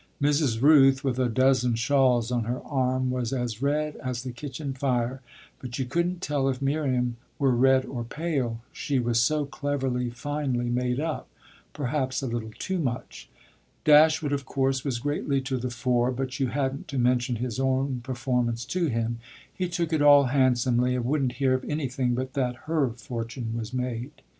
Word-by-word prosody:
Mrs. 145 -5 +2
Rooth, 135 -2 +6
with 130 -2 -1
a 125 -1 +2
dozen 130 0 +3
shawls 125 -1 +2
on 120 -2 0
her 120 +2 -2
arm, 130 -2 0
was 125 -2 -2
as 120 -3 -3
red 150 +2 0
as 125 -2 -4
the 130 - -5
kitchen 135 +2 -6
fire, 130 -1 -1 0.4
but 125 -1 -6
you 135 - -1
couldn't 170 +7 -1
tell 140 -2 +1
if 130 -1 -2
Miriam 130 -4 0 0.2
were 135 -2 +3
red 130 +2 +4
or 120 -3 -5
pale: 130 -4 -2
she 140 - -1
was 120 -2 +2
so 150 +5 +2
cleverly, 135 -3 -2
finely 125 -1 -2
made 125 +1 0
up 155 0 -3 0.4
perhaps 135 -1 -2
a - - -1
little 115 -2 -3
too 190 -1 -2
much. 125 -6 -4 0.6
Dashwood 155 -1 +5
of 140 -1 -1
course 135 0 0
was 135 -4 -1
greatly 145 +1 -1
to 130 0 -2
the 125 +1 -3
fore, 125 0 +1
but 130 +2 -4
you 135 - +2
hadn't 135 +5 -2
to 140 -3 -4
mention 125 0 +2
his 120 +1 -3
own 130 -1 0
performance 120 -2 -1
to 170 +6 0
him: 115 -2 -1 0.3
he 180 -1 -2
took 170 -2 -2
it 155 - +2
all 145 -1 +8
handsomely 125 -2 +2
and 125 -2 -2
wouldn't 135 -2 +1
hear 135 -1 +1
of 130 - -1
anything 130 -4 -1
but 130 +1 -4
that 125 -3 0
her 155 -5 +1
fortune 115 0 -5
was 115 -1 -4
made. 125 0 -3
130 Hz, 175 wpm, -26 LUFS, 120-140 Hz, 0.6 s, all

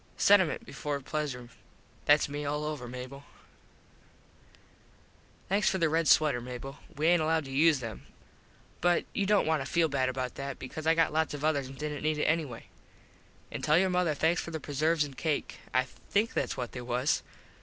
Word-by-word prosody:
Sentiment 195 -5 +4
before 145 -1 -4
pleasure. 135 -4 -4 0.6
Thats 145 +1 +5
me 145 +1 -4
all 150 +1 -2
over, 150 -5 -4
Mable. 125 +3 -8 2.2
Thanks 200 +2 +2
for 190 - 0
the 165 -3 +2
red 165 +1 +1
sweter, 150 -6 +4
Mable. 125 +3 -7 0.2
We 150 +3 -1
aint 175 0 +5
allowed 160 -1 +1
to 135 - -8
use 150 0 +4
them. 115 -3 -7 0.7
But 175 0 +3
you 200 - 0
dont 205 0 +4
want 155 -3 +1
to 135 - -8
feel 165 -1 +3
bad 130 -2 +1
about 130 -1 -3
that 140 -1 -4
cause 155 0 -5
I 165 - +5
got 165 -2 +2
lots 160 -1 0
of 145 +1 -3
others 145 -4 +1
an 135 - -10
didnt 150 +1 -4
need 155 0 0
it 150 - 0
anyway. 155 -7 -1 0.9
An - - -5
tell 150 - +4
your 185 +1 +3
mother 180 -4 +1
thanks 160 +4 +2
for - - -7
the 160 -1 -4
preserves 155 +2 +1
an 145 -2 -6
cake. 155 +2 -2
I 130 - +3 0.3
think 215 +3 +1
thats - - -1
what 125 -2 -4
they 125 - -6
was. 125 +3 0
150 Hz, 190 wpm, -30 LUFS, 135-160 Hz, 2.2 s, Thats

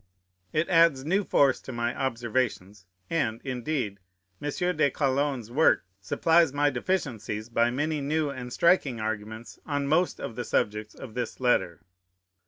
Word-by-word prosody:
It 155 +2 +1
adds 165 -6 +4
new 190 +6 +2
force 140 -7 +3
to - - -8
my 120 0 -2
observations: 115 -6 -2 0.2
and, 120 -9 -1
indeed, 125 -5 -3 0.4
M. 145 - -2 0.3
de 155 -2 +3
Calonne's 135 -4 -1
work 155 -4 +3
supplies 160 - +3
my 145 +1 +2
deficiencies 120 - -2
by 115 0 +2
many 145 +4 -1
new 150 +1 0
and 125 -2 -7
striking 150 -6 +3
arguments 110 +1 -5
on 145 -2 -2
most 160 +5 +1
of 115 - -6
the 120 - -3
subjects 105 -1 -1
of 125 -5 -10
this 125 -1 -4
letter. 120 -9 +1
130 Hz, 145 wpm, -27 LUFS, 115-150 Hz, 0.4 s, adds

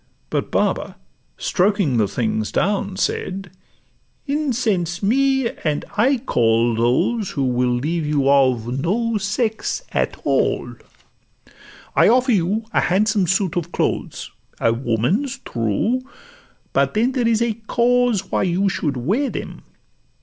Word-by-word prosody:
But - - -1
Baba, - - 0 0.4
stroking 185 - +1
The 105 -3 +2
things 110 +1 -2
down, 200 -1 0
said, 190 0 -2 0.7
'Incense 230 - -1
me, 265 +3 +2
and 150 -2 -1
I 260 +6 +3
call 115 - +2
Those 125 - +1
who 140 - -2
will 125 -1 +1
leave 150 +6 -1
you 145 -2 +1
of 130 -3 +2
no 225 +6 0
sex 220 - -2
at - - -1
all. - - 0 1.2
'I - - +5
offer 255 +2 +3
you 205 +2 +1
a - - +3
handsome 205 +1 +2
suit 190 -1 +1
of 175 -1 -3
clothes: - - -2 0.3
A 115 - +2
woman's, 130 - -1
true; 120 - -1 0.7
but - - +1
then 235 +4 +2
there 250 -3 0
is 230 0 +2
a 235 -1 0
cause 240 -5 +2
Why - - +1
you 190 +2 +1
should 145 -7 -2
wear 210 - 0
them. - - -6
195 Hz, 130 wpm, -21 LUFS, -, 1.2 s, I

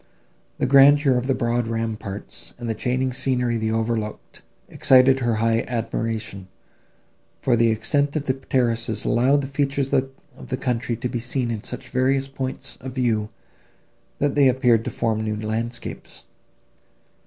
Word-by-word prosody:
The - - 0
grandeur 140 +1 +6
of 125 +1 -1
the 135 - +2
broad 120 0 0
ramparts, 110 -3 -5
and 120 -1 -6
the 115 - 0
changing 130 +3 -1
scenery 125 -2 0
they 110 0 -1
overlooked, 110 -1 -3 0.3
excited 130 0 +5
her 120 -3 0
high 115 +1 +1
admiration; 115 -4 -3 0.9
for 125 - +2
the 115 0 +3
extent 140 +7 0
of 150 -2 -2
the 130 - +1
terraces 115 -4 -1
allowed 130 +4 +3
the 135 - -5
features 140 -1 -1
of 130 0 +2 0.4
the 130 - -2
country 120 -2 -1
to 120 +2 -3
be 120 - -3
seen 125 0 -1
in 110 -2 -4
such 125 0 -7
various 135 +2 +1
points 135 -1 -6
of 130 0 -7
view, 115 -5 0 0.9
that 145 -1 0
they 140 -2 +5
appeared 125 -3 +3
to - - -1
form 110 -1 -1
new 110 -1 -2
landscapes. 110 +3 -5
125 Hz, 155 wpm, -23 LUFS, 115-135 Hz, 0.9 s, grandeur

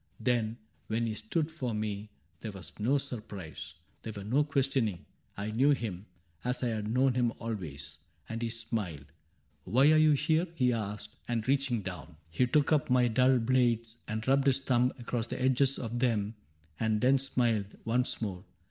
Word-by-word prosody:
Then, 115 -2 0 0.3
when 115 +2 0
he 110 - -1
stood 165 - -1
before 140 -8 -4
me, 105 -1 -3 0.3
there 105 - -5
was 95 -3 -10
no 125 +7 +3
Surprise, 95 - -6 0.3
there 110 - -5
was 100 -1 -7
no 130 +8 +3
questioning: 135 - 0 0.3
I 105 +2 -3
knew 130 +6 +3
him, 105 -7 -4 0.4
As 125 +1 -1
I 120 - +2
had 110 -2 -2
known 130 +3 +3
him 120 -1 +2
always; 90 -14 -5 0.3
and 115 +1 -4
he 115 - -1
smiled., 110 - -4 0.3
' 75 0 -40
Why 130 +10 +5
are 155 - +6
you 155 -1 +6
here? 160 +4 +2
' - - -24
he 125 -5 +3
asked; 105 -2 -4
and 115 -1 -1
reaching 135 -5 +1
down. 90 -4 -7
He 125 +9 +2
took 145 +4 +2
up 150 -4 +3
my 125 -1 +4
dull 130 +3 +4
blades 115 -2 +1
and 110 +1 -3
rubbed 135 +1 +4
his 135 0 +3
thumb 125 -1 +2
Across 120 -1 -3
the - - -4
edges 130 +1 +3
of 120 0 -3
them 110 -4 +1 0.5
and 110 -1 +1
then 130 +4 +4
smiled 115 -6 0
Once 120 +1 0
more. 95 -3 -4
115 Hz, 185 wpm, -31 LUFS, 105-130 Hz, 0.5 s, are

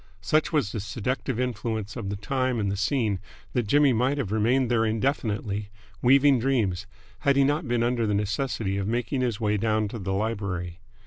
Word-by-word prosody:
Such 155 0 +1
was 145 -10 +1
the 110 - -3
seductive 115 +4 -3
influence 110 -4 -2
of 110 -6 -4
the 100 - -2
time 130 +3 -1
and 100 -2 0
the - - -1
scene 105 -1 0 0.3
that 120 -4 0
Jimmy 145 +2 +4
might 125 +5 +1
have 125 -9 -2
remained 120 +4 +2
there 115 -2 +3
indefinitely, 110 -3 -1 0.3
weaving 135 +1 +5
dreams, 105 -7 0 0.3
had 140 -1 +2
he 140 - +5
not 145 +2 +1
been 120 -1 +1
under 120 -2 +1
the 105 - +1
necessity 105 -1 -1
of 100 0 -2
making 120 +3 -1
his 120 -5 -1
way 105 -1 +1
down 110 0 +1
to 115 - -6
the 95 -1 -2
library. 100 -4 -3
115 Hz, 190 wpm, -26 LUFS, 105-130 Hz, 0.3 s, weaving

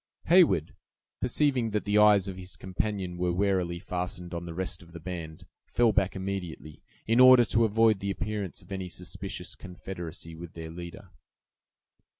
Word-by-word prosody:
Heyward, 170 - +5 0.5
perceiving 125 -2 +1
that 105 0 -2
the 105 0 +3
eyes 105 -2 +6
of 95 - -5
his 90 0 -7
companion 95 -2 -3
were 90 0 +1
warily 90 -2 0
fastened 90 +1 -4
on 85 0 -4
the 85 - -6
rest 95 +1 -3
of 85 -1 -16
the 85 - -8
band, 80 -2 -7 0.2
fell 120 -2 +3
back 95 -1 +1
immediately, 95 -5 -5 0.2
in 115 +2 +2
order 130 -1 +9
to 115 +1 +2
avoid 110 -1 +3
the 100 - -3
appearance 100 -1 -4
of - - -20
any 95 -2 -4
suspicious - - -6
confederacy 90 -2 -8
with 85 0 -9
their 80 -1 -7
leader. 85 +2 -9
95 Hz, 160 wpm, -28 LUFS, 85-105 Hz, 0.5 s, order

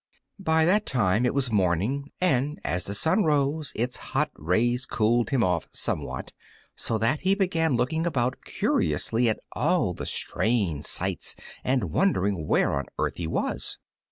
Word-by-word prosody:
By 160 -4 +3
that 205 +5 +2
time 115 -1 +2
it - - 0
was 135 -4 0
morning, 105 - 0
and 150 -4 +1
as 90 +1 -1
the 100 - -3
sun 165 - +3
rose 150 0 +1
its 125 +3 -2
hot - - -1
rays 120 - 0
cooled 115 +1 +1
him 130 -4 +2
off 90 -3 0
somewhat, - - -2 0.4
so 115 - -1
that 115 +8 +1
he 190 +1 +2
began 165 -7 +1
looking 160 +8 0
about 125 -6 -1
curiously 115 +10 +1
at 110 - -1
all - - +1
the - - -6
strange 100 -11 0
sights - - 0 0.3
and 125 - 0
wondering 100 - +1
where - - +3
on 70 0 -1
earth - - -1
he 85 - -3
was. - - -2
125 Hz, 155 wpm, -26 LUFS, 100-155 Hz, 0.4 s, By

